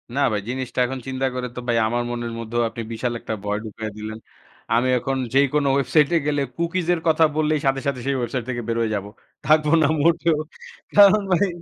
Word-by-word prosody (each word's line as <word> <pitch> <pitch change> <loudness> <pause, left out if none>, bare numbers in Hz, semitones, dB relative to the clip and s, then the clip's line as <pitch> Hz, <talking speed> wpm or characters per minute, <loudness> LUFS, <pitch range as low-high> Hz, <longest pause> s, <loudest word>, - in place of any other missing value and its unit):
না 140 - +1
ভাই, 105 -1 -1
জিনিসটা 130 0 -4
এখন 130 +1 -4
চিন্তা 130 0 -2
করে 125 0 -3
তো - - -4
ভাই 120 - +2
আমার 120 +2 -1
মনের 120 -1 -4
মধ্যেও 115 +1 -2
আপনি 115 0 -7
বিশাল 120 +2 -2
একটা 110 - -5
ভয় 105 0 -1
ঢুকাইয়া 110 0 -6
দিলেন। 110 +1 -6 0.6
আমি 120 +2 +3
এখন 135 +2 -2 0.2
যেই 140 +1 +5
কোন 150 -1 +2
ওয়েবসাইটে 150 +3 +3
গেলে 145 -1 +1
cookies 170 +1 -2 0.2
কথা 160 0 +4
বললেই 155 -1 +1
সাথে 135 0 +1
সাথে 140 -2 -1
সেই 140 0 0
ওয়েবসাইট 120 +1 -2
থেকে 120 -1 -2
বের 115 - -1
হয়ে 110 -1 0
যাব। 100 - -3 0.4
থাকব 155 0 +4 0.2
না 150 - +4
মোটেও। 165 -1 +3 0.6
কারণ 205 +1 +7
ভাই 185 +3 +3
130 Hz, 200 wpm, -22 LUFS, 120-150 Hz, 0.6 s, কারণ